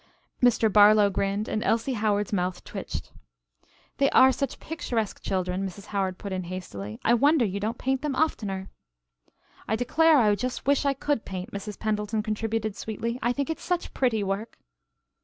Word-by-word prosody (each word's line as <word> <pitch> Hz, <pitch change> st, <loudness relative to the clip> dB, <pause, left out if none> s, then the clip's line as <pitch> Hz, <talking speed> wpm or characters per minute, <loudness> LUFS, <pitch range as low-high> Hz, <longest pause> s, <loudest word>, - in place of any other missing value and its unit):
Mr. 245 Hz, -2 st, +4 dB
Barlow 210 Hz, -1 st, +7 dB
grinned 200 Hz, +2 st, -1 dB
and 215 Hz, -, -2 dB
Elsie 230 Hz, +4 st, +1 dB
Howard's 210 Hz, -2 st, 0 dB
mouth 180 Hz, -1 st, -1 dB
twitched. -, -, -6 dB, 0.9 s
"They 275 Hz, -, +3 dB
are 260 Hz, 0 st, +6 dB
such 275 Hz, 0 st, -3 dB
picturesque 240 Hz, -10 st, -3 dB
children," 185 Hz, 0 st, -1 dB
Mrs. 195 Hz, +1 st, -6 dB
Howard 190 Hz, -2 st, -1 dB
put 200 Hz, -2 st, -6 dB
in 185 Hz, -1 st, -3 dB
hastily. 110 Hz, -, -7 dB
"I 235 Hz, -, +5 dB
wonder 280 Hz, +2 st, +4 dB
you 200 Hz, 0 st, -2 dB
don't 220 Hz, +4 st, -2 dB
paint 265 Hz, 0 st, -1 dB
them 295 Hz, -3 st, -2 dB
oftener." 205 Hz, -10 st, -1 dB, 1.0 s
"I 220 Hz, -, +1 dB
declare 310 Hz, +7 st, +4 dB
I 215 Hz, -5 st, +4 dB
just 250 Hz, +4 st, -3 dB
wish 280 Hz, +1 st, +2 dB
I 280 Hz, -1 st, +2 dB
could 285 Hz, -3 st, -1 dB
paint," 185 Hz, -1 st, -6 dB
Mrs. 200 Hz, 0 st, -6 dB
Pendleton 215 Hz, 0 st, -1 dB
contributed 220 Hz, -1 st, -2 dB
sweetly, 230 Hz, +3 st, -4 dB
"I 240 Hz, -, +2 dB
think 280 Hz, +5 st, -2 dB
it's 320 Hz, -, -5 dB
such 355 Hz, -1 st, -2 dB
pretty 230 Hz, -5 st, +1 dB
work." 200 Hz, +3 st, -3 dB
215 Hz, 170 wpm, -26 LUFS, 195-255 Hz, 1.0 s, Barlow